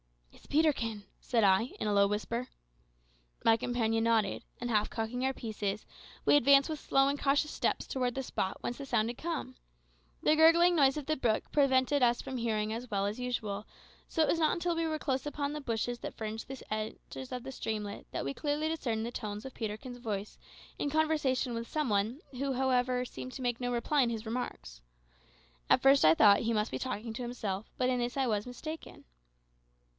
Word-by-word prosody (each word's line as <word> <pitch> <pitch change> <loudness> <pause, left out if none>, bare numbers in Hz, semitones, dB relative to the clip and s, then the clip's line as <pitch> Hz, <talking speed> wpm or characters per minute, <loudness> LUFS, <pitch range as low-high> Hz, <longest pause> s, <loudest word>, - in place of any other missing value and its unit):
"It's - - -19
Peterkin," 255 -9 +1 0.2
said 235 -4 +1
I, 195 +5 +3
in - - -1
a 210 - +1
low 200 0 +5
whisper. 230 +4 -2 1.0
My 225 - +7
companion 225 -1 0
nodded, 230 -2 +1 0.2
and 240 0 -3
half 210 -1 +2
cocking 230 +3 -3
our 265 - +2
pieces, 210 -4 -4 0.4
we - - +6
advanced 280 0 +6
with 310 -2 -3
slow 270 -2 +3
and 285 +1 0
cautious 285 +2 +2
steps - - -1
towards 250 -2 -1
the 270 - -2
spot 190 -6 -2
whence 240 - -4
the 280 - -5
sound 235 -4 +1
had 240 - -7
come. 320 -6 -4 0.7
The 305 - +5
gurgling 335 +2 +6
noise 275 -2 +4
of 295 - -4
the 310 +2 +1
brook 235 -6 0
prevented 275 0 +3
us 240 -1 +4
from 260 - -5
hearing 220 -2 -1
as 240 +2 -6
well 200 -2 0
as 205 +4 -3
usual, 220 -5 -3 0.4
so 320 - +2
it - - +2
was 330 - +1
not 315 -1 +3
until 345 0 -1
we 330 0 0
were 310 -1 -1
close 265 -1 -1
upon 290 -1 -2
the 300 - -4
bushes 240 -1 -2
that - - -6
fringed 220 0 -5
the 270 -1 -7
banks 215 +4 -5
of 250 -1 -4
the 265 - -6
streamlet 210 -5 -4
that - - -3
we 140 - -2
clearly 295 - -1
discerned 235 -9 -2
the 235 - -4
tones 210 -2 -5
of 265 - -7
Peterkin's 230 +3 -5
voice 210 -3 -4 0.4
in 285 - 0
conversation 295 -5 +1
with 230 0 -4
some 305 -2 0
one, 215 +7 0
who, 270 +1 -2
however, 250 -1 +1
seemed 255 +1 -8
to 260 - -6
make 245 0 -1
no 245 0 -1
reply 265 +4 +2
to - - -1
his 225 -1 -4
remarks. 140 - -5 0.9
At - - +4
first 275 +1 +6
I 155 +1 +7
thought 205 +1 +7
he 230 0 0
must 215 +1 0
be - - -3
talking 235 -3 -4
to 235 - -6
himself, 220 -5 -4
but 255 - +1
in 250 -1 +1
this 240 +2 -2
I 270 - +2
was 210 -2 -1
mistaken. 310 +6 -8
245 Hz, 205 wpm, -31 LUFS, 220-275 Hz, 1.0 s, My